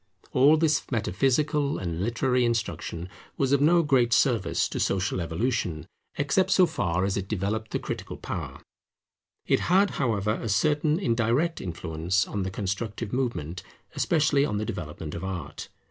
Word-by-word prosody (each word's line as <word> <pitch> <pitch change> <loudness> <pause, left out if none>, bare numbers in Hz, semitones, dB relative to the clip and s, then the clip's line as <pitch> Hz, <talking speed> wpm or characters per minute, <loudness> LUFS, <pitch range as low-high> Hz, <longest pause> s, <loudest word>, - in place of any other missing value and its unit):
All 145 +5 +5
this 155 -1 +2
metaphysical 135 - +1
and 85 -2 -3
literary 125 +4 +1
instruction 110 -7 -2 0.3
was 135 -1 +1
of 140 -1 +3
no 170 +3 +5
great 125 -5 +3
service 115 -9 +2
to - - -4
social 95 -1 0
evolution, 85 -2 -2 0.3
except 150 +7 +2
so 190 -1 +5
far 90 - -1
as 100 0 -1
it 95 -1 -3
developed 110 +2 -2
the - - -1
critical - - -6
power; - - -6 0.8
it - - +2
had, 195 +3 +3
however, 105 -5 +1
a 115 - -3
certain 150 +8 +2
indirect 125 - +1
influence 85 +1 -1
on 105 - -3
the 95 - -2
constructive 105 +3 -4
movement, 95 - -2 0.3
especially 150 -4 +2
on 105 -8 -1
the 110 - -2
development 80 -4 -6
of 85 - -6
Art. 90 -6 -6
115 Hz, 150 wpm, -26 LUFS, 95-140 Hz, 0.8 s, All